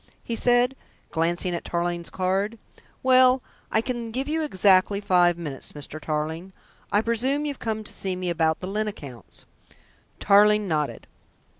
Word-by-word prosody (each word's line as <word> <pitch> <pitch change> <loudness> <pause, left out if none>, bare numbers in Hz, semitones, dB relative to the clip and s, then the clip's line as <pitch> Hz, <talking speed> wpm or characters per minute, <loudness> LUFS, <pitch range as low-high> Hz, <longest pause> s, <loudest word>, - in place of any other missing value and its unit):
he 235 - -3
said, 245 +2 +3 0.4
glancing 175 +2 0
at 170 - -3
Tarling's 170 0 -2
card. 195 +4 -1 0.5
"Well, 255 0 +5 0.3
I 220 - +3
can 240 -1 -4
give 260 +5 -3
you 320 +2 0
exactly 195 -5 +3
five 180 -4 +3
minutes, 150 -6 -6
Mr. 150 +1 -7
Tarling. 160 +5 -3 0.4
I 205 - +3
presume 255 +6 0
you've 285 -2 -4
come 220 -2 -3
to - - -4
see 190 -1 -3
me 180 -1 -2
about 160 -1 +1
the 185 - -4
Lyne 215 +2 -1
accounts?" 135 - -9 0.7
Tarling 210 +1 +5
nodded. 155 -4 -2
195 Hz, 150 wpm, -25 LUFS, 170-230 Hz, 0.7 s, Well